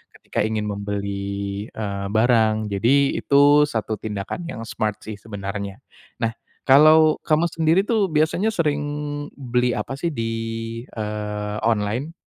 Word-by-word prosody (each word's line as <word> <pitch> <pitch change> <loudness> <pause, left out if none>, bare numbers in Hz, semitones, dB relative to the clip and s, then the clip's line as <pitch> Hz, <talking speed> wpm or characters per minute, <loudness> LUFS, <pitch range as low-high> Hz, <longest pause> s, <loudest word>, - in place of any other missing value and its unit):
ketika - - -5
ingin 110 0 0
membeli, 100 0 -4
eee, 100 -2 -4
barang. 110 -1 +2
Jadi 135 +8 +2
itu 145 +1 +5
satu 110 -4 -3
tindakan 110 - -5
yang 115 -9 -6
smart 110 -2 -3
sih 105 -2 -7
sebenarnya. 100 -2 -6 0.4
Nah, 115 - +1 0.3
kalau 155 +3 +6
kamu 160 +1 +1
sendiri 165 +4 +2
tuh 210 -3 +1
biasanya 160 +6 +1
sering 155 -8 +1 0.6
beli 125 -2 0
apa 135 +2 -4
sih 170 - -1
di, 115 0 -2 0.6
eee, 105 -1 -4
online? 115 +8 -1
110 Hz, 125 wpm, -22 LUFS, 105-150 Hz, 0.6 s, kalau